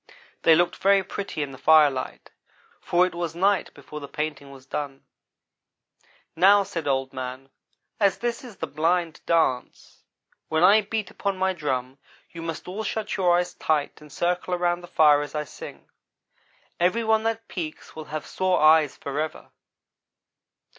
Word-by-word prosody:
They 165 - +6
looked 175 +2 +1
very 195 0 +4
pretty 195 -5 -4
in 140 - -6
the 130 - -11
firelight, 150 -4 +3 0.5
for 175 +1 +2
it 185 - -4
was 170 -2 -4
night 195 +2 +1
before 145 +2 -9
the 140 - -8
painting 150 -1 -4
was 135 -1 -14
done. 140 -1 -5 1.3
"'Now,' 200 +2 +6
said 165 -5 -5
Old 135 -1 0
man, 130 +1 -6 0.5
'as 200 -3 +3
this 240 +1 -3
is 240 -5 -11
the - - -3
Blind 165 +2 -1
dance, 160 -7 -1 0.5
when 160 +1 +1
I 205 +4 +7
beat 215 -1 -4
upon 200 -2 -3
my 190 0 +1
drum 130 -5 -3 0.3
you 165 - -8
must 165 0 -6
all 200 +4 -4
shut 215 0 -3
your 180 -3 +3
eyes 180 0 -1
tight 150 -2 -1
and 150 -1 -14
circle 180 +2 -1
around 175 0 0
the 175 - -11
fire 150 -3 +5
as 145 +1 -7
I 150 - -1
sing. 145 - -11 0.9
Every 185 +7 +2
one 220 0 +3
that 225 0 -2
peeks 160 -4 -7
will 155 -1 -7
have 155 0 -5
sore 185 -1 0
eyes 155 -2 +5
forever.' 150 +3 -5
165 Hz, 160 wpm, -25 LUFS, 150-190 Hz, 1.3 s, I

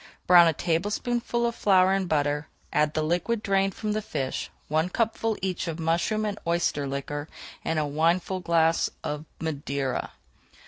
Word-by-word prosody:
Brown 175 -1 +8
a 165 - +3
tablespoonful 220 - -1
of 235 - 0
flour 190 -3 +4
in 195 -1 0
butter, 145 -1 0 0.3
add 150 0 +2
the 155 - +1
liquid 180 +8 0
drained 195 -1 +1
from 215 -1 -2
the 215 +1 -1
fish, 140 -10 -3 0.2
one 160 +3 +1
cupful 225 +1 0
each 185 -2 -2
of 165 -1 -3
mushroom 170 +7 +1
and 210 0 -3
oyster 170 -4 +1
liquor, 145 +2 -4 0.3
and 160 - -1
a 155 - +2
wineglassful 165 +2 +1
of 150 +1 -4
Madeira. 140 -4 -3
170 Hz, 150 wpm, -26 LUFS, 155-195 Hz, 0.3 s, Brown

